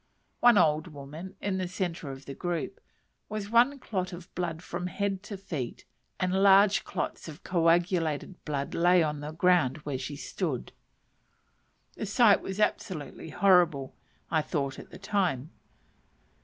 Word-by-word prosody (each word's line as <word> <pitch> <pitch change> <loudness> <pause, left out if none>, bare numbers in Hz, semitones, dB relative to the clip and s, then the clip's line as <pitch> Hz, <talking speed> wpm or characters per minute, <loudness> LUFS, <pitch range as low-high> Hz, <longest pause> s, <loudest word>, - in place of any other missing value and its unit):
One 240 -3 +6
old 155 -1 +3
woman, 155 +5 -9
in 195 -2 -1
the 185 - -1
centre 175 -4 -3
of 135 0 -8
the 140 - -6
group, 175 +4 -3 0.5
was 210 -1 -4
one 245 +5 +5
clot 185 -7 -3
of 175 +1 -10
blood 170 -2 -3
from 175 +1 -4
head 195 0 -2
to 205 0 -7
feet, 155 -10 -5 0.3
and 185 +1 +1
large 200 +1 +6
clots - - -4
of 155 +1 -10
coagulated 170 -1 +1
blood 140 -2 -3
lay 175 0 +4
on 150 -1 -2
the 145 +1 -5
ground 165 -5 +3
where 140 -3 -2
she 145 - -5
stood. 140 - -3 1.2
The 215 - -4
sight 210 0 +5
was 190 +1 -5
absolutely 165 -7 -2
horrible, 175 -8 +3 0.4
I 160 -1 +3
thought 140 -3 -2
at - - -11
the - - -11
time. 180 -8 -1
175 Hz, 150 wpm, -29 LUFS, 150-195 Hz, 1.2 s, One